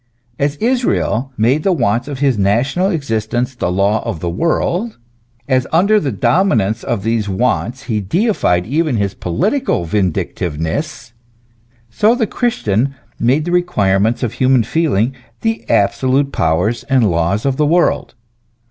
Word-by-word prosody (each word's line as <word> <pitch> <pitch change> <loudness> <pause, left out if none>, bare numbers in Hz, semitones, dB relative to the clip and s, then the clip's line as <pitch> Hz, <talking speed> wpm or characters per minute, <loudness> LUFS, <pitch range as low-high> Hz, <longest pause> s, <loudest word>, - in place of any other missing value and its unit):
As 140 +1 0
Israel 225 - 0
made 125 +7 +2
the 195 - +1
wants 120 - 0
of 145 -2 -5
his 135 -2 +2
national 120 - +1
existence 120 - -2
the 120 -8 -2
law 100 +4 +1
of 110 -8 -4
the 85 +1 -3
world, 170 - -1 0.5
as, 130 -1 +1
under 200 +6 +4
the 140 -8 -2
dominance 110 - +1
of 95 - -2
these 110 -2 -1
wants, 125 +5 -1
he 110 -5 -2
deified 100 - +1
even 150 - 0
his 100 -1 -1
political 185 - -1
vindictiveness: 90 - -2 0.8
so 215 - +3
the 240 -3 +1
Christian 140 - -1 0.2
made 135 +6 +2
the 175 - -2
requirements 110 - +1
of 120 -2 -2
human 130 0 +3
feeling 135 -3 0 0.3
the 110 +1 -2
absolute 130 +7 +2
powers 90 +9 0
and 130 -7 +2
laws 85 +7 0
of 135 -1 0
the 150 - +2
world. 170 +3 +1
125 Hz, 140 wpm, -16 LUFS, 100-155 Hz, 0.8 s, under